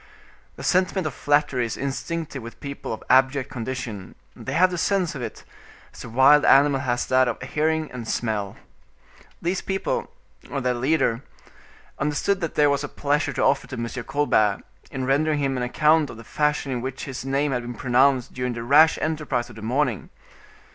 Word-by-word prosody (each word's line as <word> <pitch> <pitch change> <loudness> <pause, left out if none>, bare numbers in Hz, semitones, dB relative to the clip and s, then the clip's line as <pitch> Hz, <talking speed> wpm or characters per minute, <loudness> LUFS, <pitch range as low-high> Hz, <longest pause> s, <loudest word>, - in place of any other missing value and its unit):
The - - -9
sentiment 185 0 +1
of 155 - -2
flattery 145 -3 +1
is 115 - -3
instinctive 145 +1 -4
with 115 +1 -10
people 140 0 -6
of 110 - -5
abject 130 +1 +3
condition; 115 -5 -5 0.2
they - - -6
have 185 +1 +4
the 180 - -3
sense 190 -2 +1
of 140 - -6
it, - - -7 0.5
as - - -11
the - - -8
wild 135 +5 +6
animal 140 0 +5
has 120 -2 -1
that 130 0 +3
of 120 - -2
hearing 155 +3 -1
and 120 -3 -7
smell. 105 -5 -2 0.9
These 180 +2 -1
people, 195 - -2 0.4
or 140 - -2
their 125 -1 0
leader, 125 -2 +1 0.8
understood 150 +7 0
that 165 - -3
there 145 -1 +4
was 140 0 0
a 145 - -4
pleasure 145 +1 -1
to - - -1
offer - - +2
to - - -7
M. 115 0 -3 0.2
Colbert, 110 -9 +1 0.3
in 130 -1 -4
rendering 150 +3 +2
him 135 -2 0
an 125 - -2
account 150 +4 +2
of - - -9
the 115 - -10
fashion 150 +2 -1
in 125 -2 -2
which 130 +1 -5
his 135 -2 -6
name 135 +2 0
had 125 -2 -1
been 120 0 -7
pronounced 130 +1 +2
during 125 -1 -2
the 115 0 -5
rash 150 +6 +5
enterprise 150 -6 -2
of - - -14
the 110 - -10
morning. 120 - -1
135 Hz, 190 wpm, -24 LUFS, 125-150 Hz, 0.9 s, wild